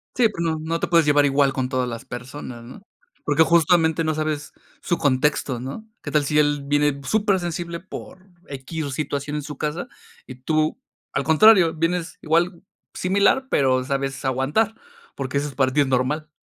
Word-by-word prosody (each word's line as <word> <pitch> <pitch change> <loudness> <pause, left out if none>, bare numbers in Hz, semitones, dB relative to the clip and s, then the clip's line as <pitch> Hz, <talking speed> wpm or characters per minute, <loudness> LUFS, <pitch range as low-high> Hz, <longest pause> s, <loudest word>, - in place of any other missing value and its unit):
Sí, 245 -2 +4
pues 170 -6 -5
no, 160 -1 0
no 165 +1 -2
te - - -1
puedes 170 -2 +4
llevar 145 -1 +4
igual 140 -1 +2
con 130 -1 -2
todas 130 -1 -1
las 115 +1 -6
personas, 125 -1 -8
¿no? 130 +11 -12 0.4
Porque 160 - +4
justamente 165 0 +3
no 155 0 0
sabes 155 -1 -3 0.3
su 175 - 0
contexto, 135 -2 +1
¿no? 140 - -7
¿Qué - - -6
tal 150 -1 +2
si 150 +2 0
él 145 -1 +2
viene 145 0 +1
supersensible 175 -5 -1
por 185 0 -10 0.2
equis 140 +1 -5
situación 145 0 -3
en - - -3
su 145 -1 -8
casa. 150 +4 -3 0.4
Y 130 - -8
tú, 155 +4 0 0.4
al - - 0
contrario, 170 0 +6
vienes 165 +1 -2
igual 170 +3 +1 0.3
similar, 200 +8 +2
pero 130 -2 +2
sabes 135 -1 -3
aguantar, 140 - +1 0.4
porque 135 0 -3
eso 145 +1 -1
es 140 - -9
para 130 -1 +2
tí, 145 - 0
es 140 - +4
normal? 135 +4 0
150 Hz, 180 wpm, -22 LUFS, 135-170 Hz, 0.4 s, contrario